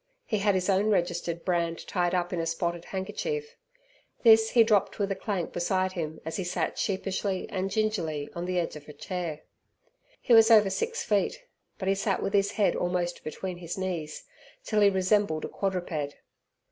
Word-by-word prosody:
He 215 Hz, -, -1 dB
had 200 Hz, -1 st, +2 dB
his 185 Hz, -1 st, 0 dB
own 195 Hz, +1 st, +3 dB
registered 175 Hz, -3 st, -1 dB
brand 170 Hz, -2 st, -1 dB
tied 175 Hz, -1 st, 0 dB
up 175 Hz, 0 st, -1 dB
in 175 Hz, -, -1 dB
a 165 Hz, -, -1 dB
spotted 170 Hz, +1 st, -2 dB
handkerchief. 445 Hz, -, -4 dB, 0.7 s
This 225 Hz, -1 st, +7 dB
he 235 Hz, -, +6 dB
dropped 215 Hz, -3 st, +2 dB
with 200 Hz, -1 st, -1 dB
a -, -, 0 dB
clank 190 Hz, -5 st, -3 dB
beside 185 Hz, +2 st, 0 dB
him 160 Hz, -4 st, -4 dB
as 160 Hz, -, -4 dB
he 190 Hz, -, -2 dB
sat 175 Hz, -, -2 dB
sheepishly 195 Hz, -1 st, -1 dB
and 190 Hz, 0 st, -1 dB
gingerly 185 Hz, -9 st, -1 dB
on 170 Hz, +1 st, -4 dB
the 180 Hz, 0 st, -1 dB
edge 170 Hz, -3 st, -1 dB
of 150 Hz, 0 st, -11 dB
a -, -, -8 dB
chair. 165 Hz, -1 st, -5 dB, 0.8 s
He 245 Hz, -, +2 dB
was 225 Hz, 0 st, +8 dB
over 210 Hz, -4 st, +6 dB
six 465 Hz, -, -2 dB
feet, 215 Hz, -, 0 dB, 0.3 s
but 190 Hz, -, -4 dB
he 195 Hz, -, +4 dB
sat 195 Hz, 0 st, -1 dB
with 195 Hz, -, -2 dB
his 200 Hz, 0 st, +2 dB
head 210 Hz, -2 st, +2 dB
almost 175 Hz, 0 st, -1 dB
between 180 Hz, +4 st, -5 dB
his 175 Hz, 0 st, -6 dB
knees, 175 Hz, -5 st, -4 dB, 0.4 s
till 215 Hz, -1 st, +1 dB
he 200 Hz, -, +7 dB
resembled 190 Hz, -3 st, +1 dB
a -, -, -6 dB
quadruped. 175 Hz, -7 st, -3 dB
185 Hz, 185 wpm, -28 LUFS, 175-205 Hz, 0.8 s, was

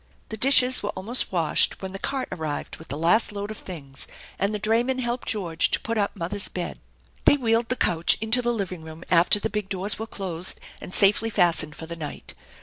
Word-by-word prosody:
The 220 Hz, -, -5 dB
dishes 255 Hz, +1 st, +6 dB
were 205 Hz, -, -4 dB
almost 220 Hz, +7 st, 0 dB
washed 165 Hz, -5 st, +3 dB
when 190 Hz, -1 st, -7 dB
the 195 Hz, -, -7 dB
cart 270 Hz, +3 st, -3 dB
arrived 155 Hz, -3 st, -5 dB
with 160 Hz, -, -13 dB
the 140 Hz, -, -5 dB
last 175 Hz, +10 st, +2 dB
load 205 Hz, +1 st, -6 dB
of 215 Hz, -, -8 dB
things, 140 Hz, -7 st, -9 dB, 0.3 s
and 200 Hz, +1 st, 0 dB
the 210 Hz, -, -2 dB
drayman 230 Hz, +5 st, 0 dB
helped 240 Hz, -1 st, -3 dB
George 175 Hz, -7 st, +1 dB
to -, -, +1 dB
put 230 Hz, -, -4 dB
up 205 Hz, -2 st, -1 dB
mother's 195 Hz, +2 st, -3 dB
bed. 180 Hz, -1 st, -6 dB, 0.5 s
They 290 Hz, -, +5 dB
wheeled 230 Hz, -2 st, 0 dB
the 255 Hz, -, 0 dB
couch 170 Hz, -8 st, +2 dB
into 225 Hz, +3 st, +2 dB
the 240 Hz, 0 st, 0 dB
living 190 Hz, -7 st, -4 dB
room 160 Hz, +1 st, -11 dB
after 175 Hz, +4 st, +5 dB
the 210 Hz, -, -2 dB
big 210 Hz, -2 st, -4 dB
doors 195 Hz, +2 st, +1 dB
were 225 Hz, -, -5 dB
closed 185 Hz, -4 st, -2 dB, 0.2 s
and -, -, -9 dB
safely 205 Hz, +4 st, +4 dB
fastened 170 Hz, -7 st, +1 dB
for 160 Hz, -, -9 dB
the 170 Hz, +1 st, -7 dB
night. 155 Hz, -3 st, -8 dB
200 Hz, 215 wpm, -24 LUFS, 170-225 Hz, 0.5 s, dishes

